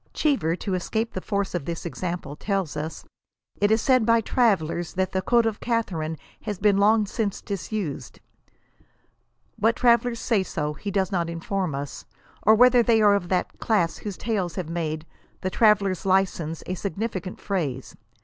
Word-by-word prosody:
Cheever, 265 - +1
to 195 +1 -4
escape 220 +5 -2
the 185 - -4
force 200 0 -2
of 175 -6 -2
this 170 +1 -5
example, 170 -3 -4
tells 195 -4 -2
us 155 +2 -5 0.3
" - - -37
it 205 - +4
is 220 +1 +2
said 255 -3 +4
by 230 +1 +4
travellers 190 -8 +1
that 185 0 0
the 190 - 0
code 235 +4 +3
of 220 -2 -1
Catharine 175 -10 -2 0.2
has 205 - -4
been 200 +1 +3
long 215 +1 +4
since 205 0 -2
disused." 195 - -5 1.4
"What 225 +2 +3
travellers 235 -1 +3
say 225 -5 +1
so, 150 -5 -3
he 200 +7 -6
does 190 -1 0
not 170 -3 0
inform 170 -1 -2
us, 140 0 -6 0.4
or 215 +2 +6
whether 250 +1 +6
they 230 -1 +3
are 205 -1 +6
of 185 -4 -1
that 180 -1 -1
class 190 -8 +1
whose 205 -3 -6
tales 200 -6 -2
have 180 -4 -4
made 160 -2 -3 0.2
" - - -35
the 185 - -2
traveller's 200 -5 +3
license" 185 -4 0
a 185 - -3
sig 185 -2 -4
nificant 195 -4 -4
phrase. 145 -10 -3
195 Hz, 180 wpm, -25 LUFS, 170-220 Hz, 1.4 s, or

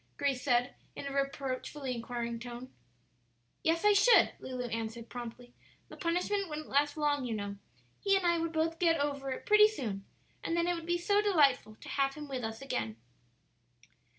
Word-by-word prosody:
Grace 275 -3 0
said, 245 -2 +2 0.2
in - - -6
a 280 - -4
reproachfully 275 0 -2
inquiring 235 0 -4
tone. 245 +1 -8 0.9
"Yes, 330 +4 +1
I 415 - +7
should," 410 +5 +6
Lulu 255 -1 -5
answered, 225 +1 -4
promptly; 245 0 -8 0.4
"the - - -10
punishment 360 +3 0
wouldn't 305 0 -6
last 290 +2 +2
long, 290 -2 +1
you 235 -3 -2
know; 200 -1 -4 0.5
he 395 -1 +4
and 380 - -2
I 340 -1 +3
would 330 0 -1
both 325 +1 0
get 330 -3 +3
over 280 -1 -1
it 260 - -5
pretty 425 0 +7
soon, 225 - -4 0.4
and 335 - -1
then 340 0 +2
it 355 - +2
would 335 -1 -6
be 345 0 +2
so 405 +4 +2
delightful 285 - +3
to - - -10
have 275 -1 +1
him 300 -1 -7
with 260 -3 -4
us 225 +3 -5
again." 110 - -2
280 Hz, 180 wpm, -32 LUFS, 245-335 Hz, 0.9 s, I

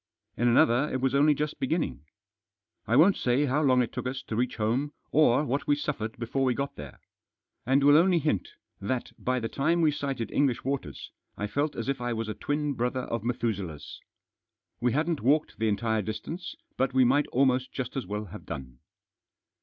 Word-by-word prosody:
In 120 - +1
another 120 +4 +4
it 130 - -1
was 130 +1 0
only 145 +2 +4
just 150 +1 -3
beginning. 130 - -2 0.8
I 115 - +2
won't 175 +8 +6
say 125 +4 +2
how 145 +2 +1
long 130 -4 +4
it 115 - -6
took - - -3
us 130 +1 -4
to 110 - -5
reach 125 +2 0
home 120 +7 -1 0.2
or 150 -2 +4
what 140 +2 -2
we 145 - +4
suffered 125 -7 -4
before 120 +3 -2
we 130 -2 +2
got 140 0 -3
there. 70 -3 -10 0.7
And 135 +2 +3
will 145 +1 +7
only 175 +2 +4
hint 160 - 0 0.3
that 120 +5 -3
by 125 0 0
the 115 - -2
time 160 +8 +1
we 160 -2 +4
sighted 135 -6 -3
English 135 -4 +1
waters, 140 0 -4 0.3
I 105 - -2
felt 145 +8 -1
as 115 - -4
if 135 -2 -1
I 120 0 -1
was 115 -1 -3
a - - -2
twin 145 +6 -2
brother 125 +1 -1
of 115 -3 -4
Methuselah's. 100 -10 -3 0.8
We 120 0 +1
hadn't 155 +2 0
walked 145 +2 +1
the 110 - +1
entire 110 +1 0
distance, 155 - -6 0.2
but 130 0 0
we 130 -1 +6
might 145 +4 +3
almost 130 0 +1
just 130 -2 -5
as 135 - -3
well 105 +1 -3
have 95 - -11
done. 65 -2 -7
130 Hz, 195 wpm, -28 LUFS, 115-145 Hz, 0.8 s, will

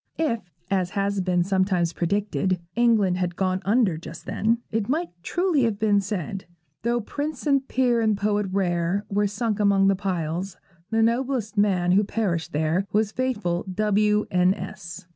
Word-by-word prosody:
If, 230 - -1 0.2
as 185 -2 +1
has 200 0 0
been 180 -1 +1
sometimes 185 -2 +1
predicted, 190 +1 0 0.2
England 220 -6 +3
had 175 -1 -1
gone 185 0 0
under 205 -6 +2
just - - -10
then, 225 +2 +1
it 220 -1 -1
might 330 +5 0
truly 350 - +1
have 225 -4 +1
been 205 -1 +3
said, 195 -1 -4 0.4
Though 235 +2 0
prince 285 +4 -5
and 275 -2 +2
peer 245 -2 +2
and 215 -2 +2
poet 205 0 0
rare 185 +1 0
Were 205 +1 +1
sunk 210 +1 -2
among 200 -1 +4
the 195 - +3
piles, 180 -1 -3 0.3
The 225 0 +2
noblest 235 -1 0
man 190 -4 +2
who 200 +3 +4
perished 195 -6 -2
there 160 +6 0
Was 215 0 +1
faithful 210 -9 -1
W. 210 0 +2
N 180 +1 +3
s. 175 +2 -8
200 Hz, 160 wpm, -24 LUFS, 185-225 Hz, 0.4 s, among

